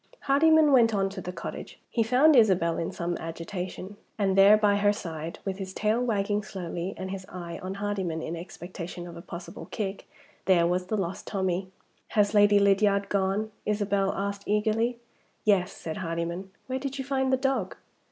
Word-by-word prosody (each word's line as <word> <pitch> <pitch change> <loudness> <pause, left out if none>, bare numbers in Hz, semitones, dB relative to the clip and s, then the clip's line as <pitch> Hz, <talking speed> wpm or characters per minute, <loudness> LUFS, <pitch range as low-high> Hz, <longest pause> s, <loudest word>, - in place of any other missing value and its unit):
HARDYMAN 310 +2 +5
went 230 -4 +5
on 195 -1 +1
to 195 -1 -6
the 180 - -5
cottage. - - -7
He 235 - +1
found 255 +7 +5
Isabel 185 -8 +4
in 165 - -2
some 170 0 -3
agitation. 180 +4 -6 0.2
And 195 -3 +1
there, 200 +2 +8
by 205 -1 +3
her 205 0 +4
side, 165 -5 -5
with 195 0 -3
his 190 -1 -6
tail 215 +3 +1
wagging 210 -3 0
slowly, 185 -2 -5
and 190 0 -5
his 195 -1 -5
eye 170 -2 -7
on 185 +1 -5
Hardyman 200 -5 -2
in 165 - -4
expectation 175 0 -7
of 170 -1 -9
a 170 - -8
possible 170 +1 -9
kick 200 -2 -4 0.4
there 175 -3 +4
was 180 +1 0
the 215 - -1
lost 195 0 -4
Tommie! 190 -1 -1 0.5
"Has 205 0 +4
Lady 205 0 +6
Lydiard 200 0 +3
gone?" 200 +2 0
Isabel 200 -2 +1
asked 200 0 -4
eagerly. 220 +3 +1 0.5
"Yes," 195 -4 +3
said 160 -1 -6
Hardyman. 170 +2 -3 0.2
"Where 260 0 -3
did 275 0 -4
you 270 - -4
find 265 -1 0
the 260 - +4
dog?" 260 -8 -1
195 Hz, 180 wpm, -27 LUFS, 180-215 Hz, 0.5 s, there